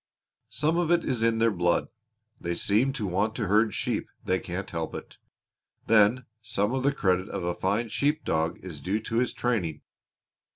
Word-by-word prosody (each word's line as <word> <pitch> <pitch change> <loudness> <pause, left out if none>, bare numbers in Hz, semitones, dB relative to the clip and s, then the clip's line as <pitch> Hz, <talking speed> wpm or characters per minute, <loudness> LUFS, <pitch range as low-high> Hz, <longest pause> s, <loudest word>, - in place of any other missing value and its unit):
"Some 155 +4 +1
of 170 -2 0
it 175 -1 +3
is 120 -3 -1
in 115 0 +3
their 115 0 +3
blood. 90 -3 +1 0.5
They 85 0 -2
seem 110 +10 +2
to 110 - -3
want 100 +4 0
to 115 - -1
herd 105 +2 +3
sheep - - -1 0.2
they 95 0 +1
can't 90 +2 -5
help 80 -1 -4
it. - - -9 0.7
Then 115 +3 +4 0.2
some 105 0 -1
of 130 - 0
the 140 +2 +3
credit 95 -7 +1
of - - -4
a 90 0 0
fine 100 +6 0
sheep 150 +7 0
dog 80 +1 0
is 85 -6 -8
due 95 +7 0
to 115 +1 -3
his 125 +1 +2
training. 100 -11 -1
105 Hz, 190 wpm, -27 LUFS, 90-120 Hz, 0.7 s, Then